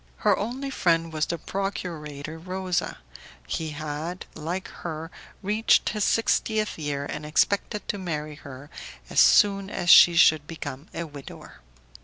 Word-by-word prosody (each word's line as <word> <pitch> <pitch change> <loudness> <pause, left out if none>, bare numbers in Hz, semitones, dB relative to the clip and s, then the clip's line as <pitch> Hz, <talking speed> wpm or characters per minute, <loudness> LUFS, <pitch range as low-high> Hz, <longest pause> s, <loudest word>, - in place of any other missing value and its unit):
Her 205 -2 +5
only 255 +7 -4
friend 165 -7 +1
was 155 0 0
the 170 - -2
procurator 160 -5 -5
Rosa; 185 +1 -2 0.5
he 160 - -3
had, 155 +4 -5
like 170 +5 -4
her, 165 0 -5 0.3
reached 210 +3 +3
his 210 -2 -1
sixtieth 220 -3 +1
year, 145 -2 -3
and 150 +1 -6
expected 200 +7 0
to 205 - -2
marry 155 -4 -4
her 145 0 -11 0.4
as - - +2
soon 200 -2 +5
as 175 -3 +2
he 175 - +9
should 155 -3 +5
become 155 -3 -7
a 170 - -4
widower. 140 - -11
165 Hz, 140 wpm, -25 LUFS, 150-195 Hz, 0.5 s, he